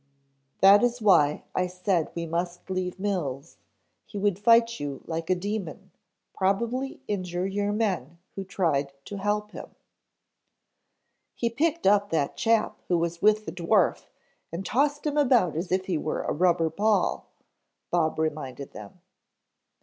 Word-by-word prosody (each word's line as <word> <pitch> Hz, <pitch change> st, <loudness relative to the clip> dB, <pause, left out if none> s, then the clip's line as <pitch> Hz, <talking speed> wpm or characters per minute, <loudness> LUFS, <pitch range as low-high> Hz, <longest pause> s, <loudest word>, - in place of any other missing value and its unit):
"That 200 Hz, +1 st, +8 dB
is 245 Hz, 0 st, +1 dB
why 165 Hz, -9 st, +4 dB
I 185 Hz, -, 0 dB
said 180 Hz, -2 st, -1 dB
we 170 Hz, 0 st, -3 dB
must 175 Hz, +2 st, -3 dB
leave 185 Hz, 0 st, -3 dB
Mills. 170 Hz, -8 st, -3 dB, 0.5 s
He 205 Hz, -, -8 dB
would 200 Hz, -2 st, 0 dB
fight 230 Hz, +1 st, +4 dB
you 140 Hz, -2 st, -5 dB
like 165 Hz, 0 st, -4 dB
a 185 Hz, -, +4 dB
demon, 195 Hz, -2 st, -5 dB, 0.4 s
probably 235 Hz, +8 st, -1 dB
injure 180 Hz, -3 st, -2 dB
your 200 Hz, +1 st, -1 dB
men 185 Hz, -, -2 dB, 0.2 s
who 195 Hz, -, -5 dB
tried 155 Hz, -8 st, -1 dB
to 205 Hz, -, -6 dB
help 210 Hz, +1 st, -1 dB
him -, -, -8 dB, 0.9 s
" -, -, -52 dB
"He 235 Hz, -1 st, -1 dB
picked 325 Hz, +7 st, 0 dB
up 205 Hz, 0 st, +4 dB
that 145 Hz, -4 st, 0 dB
chap 225 Hz, -1 st, +1 dB
who 175 Hz, -, +2 dB
was 170 Hz, 0 st, -2 dB
with 215 Hz, 0 st, +3 dB
the -, -, -5 dB
dwarf 170 Hz, -1 st, +1 dB, 0.4 s
and 175 Hz, +4 st, -5 dB
tossed 290 Hz, +7 st, 0 dB
him 300 Hz, 0 st, -1 dB
about 245 Hz, -, +3 dB
as 175 Hz, +3 st, -3 dB
if 185 Hz, 0 st, +1 dB
he 175 Hz, -5 st, -1 dB
were 155 Hz, -, -2 dB
a -, -, -1 dB
rubber 170 Hz, -1 st, +2 dB
ball," 210 Hz, +5 st, +1 dB, 0.6 s
Bob 165 Hz, -3 st, +1 dB
reminded 145 Hz, -4 st, -3 dB
them. 105 Hz, -, -11 dB
185 Hz, 150 wpm, -26 LUFS, 165-210 Hz, 0.9 s, That